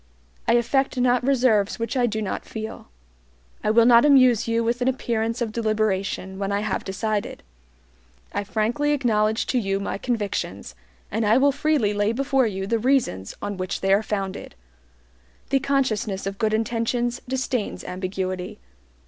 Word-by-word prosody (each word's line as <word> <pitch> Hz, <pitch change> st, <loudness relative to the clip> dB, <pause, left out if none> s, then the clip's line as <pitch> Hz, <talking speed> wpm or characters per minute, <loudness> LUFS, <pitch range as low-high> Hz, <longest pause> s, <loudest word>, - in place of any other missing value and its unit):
I -, -, +4 dB
affect 255 Hz, +3 st, +1 dB
not 245 Hz, 0 st, +3 dB
reserves 245 Hz, -6 st, +2 dB
which 230 Hz, +1 st, -3 dB
I 245 Hz, -2 st, +3 dB
do 220 Hz, -1 st, -2 dB
not 195 Hz, -, -3 dB
feel. 220 Hz, 0 st, -7 dB, 0.8 s
I -, -, +1 dB
will 230 Hz, +1 st, +5 dB
not 235 Hz, -1 st, +7 dB
amuse 255 Hz, -6 st, +5 dB
you 230 Hz, 0 st, +1 dB
with 235 Hz, +2 st, -1 dB
an 245 Hz, -, +1 dB
appearance 230 Hz, -2 st, -1 dB
of 225 Hz, -, -4 dB
deliberation 210 Hz, -4 st, -1 dB
when 200 Hz, 0 st, -2 dB
I 200 Hz, 0 st, 0 dB
have 210 Hz, -2 st, -2 dB
decided. 210 Hz, +2 st, -3 dB, 0.9 s
I -, -, -1 dB
frankly 225 Hz, +9 st, 0 dB
acknowledge 220 Hz, -5 st, +1 dB
to 255 Hz, -, +1 dB
you 195 Hz, -3 st, -1 dB
my 195 Hz, 0 st, -4 dB
convictions, 225 Hz, -5 st, -3 dB, 0.4 s
and 225 Hz, -, 0 dB
I 215 Hz, +2 st, +4 dB
will 280 Hz, +2 st, +4 dB
freely 280 Hz, -7 st, +1 dB
lay 205 Hz, +2 st, +1 dB
before 270 Hz, 0 st, +1 dB
you 195 Hz, -2 st, -3 dB
the 230 Hz, +3 st, 0 dB
reasons 230 Hz, -, 0 dB
on 205 Hz, -1 st, -3 dB
which 185 Hz, 0 st, -3 dB
they 195 Hz, 0 st, +3 dB
are 200 Hz, -, +4 dB
founded. 195 Hz, -, -4 dB, 1.0 s
The 270 Hz, -, +4 dB
consciousness 260 Hz, -8 st, -1 dB
of 195 Hz, 0 st, -4 dB
good 220 Hz, -1 st, +2 dB
intentions 235 Hz, +2 st, -1 dB
disdains 255 Hz, -3 st, -2 dB
ambiguity. 185 Hz, +1 st, -4 dB
220 Hz, 160 wpm, -24 LUFS, 205-245 Hz, 1.0 s, not